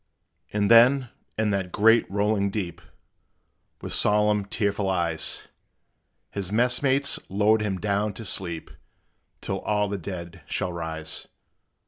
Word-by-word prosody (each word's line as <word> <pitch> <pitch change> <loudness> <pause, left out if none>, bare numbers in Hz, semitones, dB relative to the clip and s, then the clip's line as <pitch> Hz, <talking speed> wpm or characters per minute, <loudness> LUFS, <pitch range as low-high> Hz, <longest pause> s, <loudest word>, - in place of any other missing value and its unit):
And 105 +1 +1
then, 125 +2 +6 0.3
in 110 -1 +1
that 95 -2 -2
great, 115 +4 +4
rolling 100 0 +1
deep, 95 -4 -4 1.0
With - - -5
solemn, 105 -1 +3
tearful 100 -1 -1
eyes, 85 -3 0 0.8
His 100 -2 -4
mess 125 +3 +3
mates 140 0 +2
lowered 105 +3 +3
him 100 -3 -2
down, 105 +1 0
to 110 +4 -9
sleep 85 -4 -4 0.7
Till - - -3
all 105 -1 0
the 100 -1 -3
dead 85 -1 -7
shall 90 - -2
rise. 80 -2 -4
100 Hz, 125 wpm, -25 LUFS, 95-110 Hz, 1.0 s, then